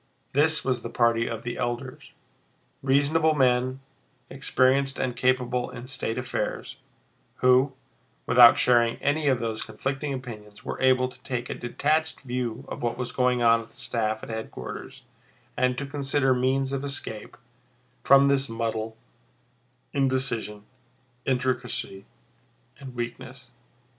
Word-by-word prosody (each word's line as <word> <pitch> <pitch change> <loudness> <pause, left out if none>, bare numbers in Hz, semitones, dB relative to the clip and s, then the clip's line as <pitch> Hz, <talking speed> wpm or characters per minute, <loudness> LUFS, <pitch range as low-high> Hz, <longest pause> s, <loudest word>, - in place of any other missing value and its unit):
This 155 +3 +2
was 130 -2 0
the 115 - -6
party 115 -1 +2
of 115 - -5
the 120 - -4
elders, 120 +2 -4 0.7
reasonable 145 +4 +3
men 130 -1 +2 0.5
experienced 135 0 +2
and 125 -2 -1
capable 125 0 +1
in 120 0 -9
state 130 -3 -3
affairs, 125 0 -3 0.6
who, 130 +2 +4 0.5
without 120 +2 +8
sharing 120 -4 +3
any 145 +1 0
of 130 -3 +3
those 110 -1 -3
conflicting 135 +6 -3
opinions, 110 -6 -8
were - - -5
able 130 -1 +4
to 125 - -14
take 125 -2 -4
a - - -1
detached 155 +6 -1
view 125 -1 -4
of - - -7
what 120 0 -1
was 125 -1 -4
going 125 -1 +1
on 115 0 +5
at 115 - -13
the - - -23
staff 115 -4 -2
at - - -8
headquarters 110 0 -7 0.5
and 125 0 +1
to 140 - -3
consider 140 -1 +1
means 130 +2 +1
of 135 0 -2
escape 135 -6 -5 0.7
from 140 0 +7
this 140 -2 +2
muddle, 115 -1 -3 1.0
indecision, 130 -6 0 0.6
intricacy, 125 -6 -2 0.7
and 130 -2 -10
weakness. 120 +1 -6
125 Hz, 135 wpm, -26 LUFS, 120-135 Hz, 1.0 s, without